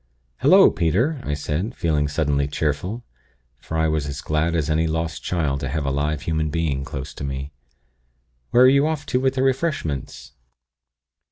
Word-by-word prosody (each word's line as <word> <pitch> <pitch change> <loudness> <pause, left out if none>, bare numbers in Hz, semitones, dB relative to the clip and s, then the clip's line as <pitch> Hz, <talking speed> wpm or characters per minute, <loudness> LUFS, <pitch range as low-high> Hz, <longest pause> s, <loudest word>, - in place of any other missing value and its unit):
"'Hullo, - - +7
Peter!' 120 - 0
I 75 - -2
said, 80 - -3
feeling 75 -3 0
suddenly 70 -1 0
cheerful; 80 +10 -2 0.6
for 80 - -5
I 80 0 +2
was 75 -2 -1
as 70 0 -5
glad 80 +2 0
as 80 -3 0
any 80 +1 +1
lost 80 0 -2
child 75 -6 -1
to 70 -2 -3
have 75 +1 -2
a 70 - 0
live 75 +1 -1
human 80 -1 -1
being 75 -3 -1
close 70 -1 -6
to - - -8
me. 70 +1 -4 1.0
'Where 125 - +5
are - - +8
you 140 +3 +4
off 155 -2 -2
to 125 - 0
with 130 0 +1
the 130 - +1
refreshments?' 130 - -2
80 Hz, 175 wpm, -22 LUFS, 70-95 Hz, 1.0 s, are